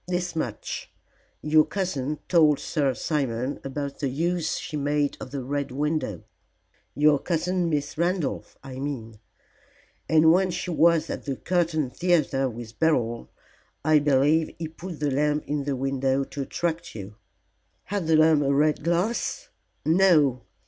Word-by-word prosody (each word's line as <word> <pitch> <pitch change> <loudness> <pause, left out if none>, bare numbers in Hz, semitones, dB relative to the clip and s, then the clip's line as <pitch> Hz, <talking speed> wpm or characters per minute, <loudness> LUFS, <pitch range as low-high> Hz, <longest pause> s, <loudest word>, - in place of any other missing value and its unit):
"This 180 -1 -2
much. 120 -9 -4 0.5
Your 155 0 +5
cousin 150 -8 -2
told 155 -5 +5
Sir 140 -5 0
Simon 130 -3 -2
about 140 +1 -5
the 140 - -1
use 165 +3 -1
she 160 - -6
made 145 0 0
of 130 - -7
the 135 -1 -5
Red 140 +2 -2
Window 145 - -2 0.7
your 145 +1 +4
cousin 175 +2 -1
Miss 150 0 -2
Randolph, 175 -3 -1
I 130 -1 -8
mean 115 -6 -5 0.9
and 160 0 +6
when 185 +2 +3
she 180 0 -3
was 165 -1 +3
at - - -6
the 140 -2 -2
Curtain 165 -5 0
Theatre 150 -7 +1
with 115 -1 -9
Beryl, 120 -8 +1 0.6
I 155 -1 +5
believe 145 +3 +2
he 165 -1 -4
put 170 +1 -8
the 145 -1 0
lamp 150 +2 +1
in 145 -1 -2
the 140 -2 -1
window 135 +1 0
to 140 - -6
attract 170 +3 -3
you." 100 -1 -7 0.7
"Had 200 -4 -3
the 160 - +4
lamp 155 -1 +5
a 140 -1 +1
red 150 +1 +2
glass?" 190 - -1 0.4
"No. 155 -7 +4
150 Hz, 150 wpm, -25 LUFS, 135-165 Hz, 0.9 s, and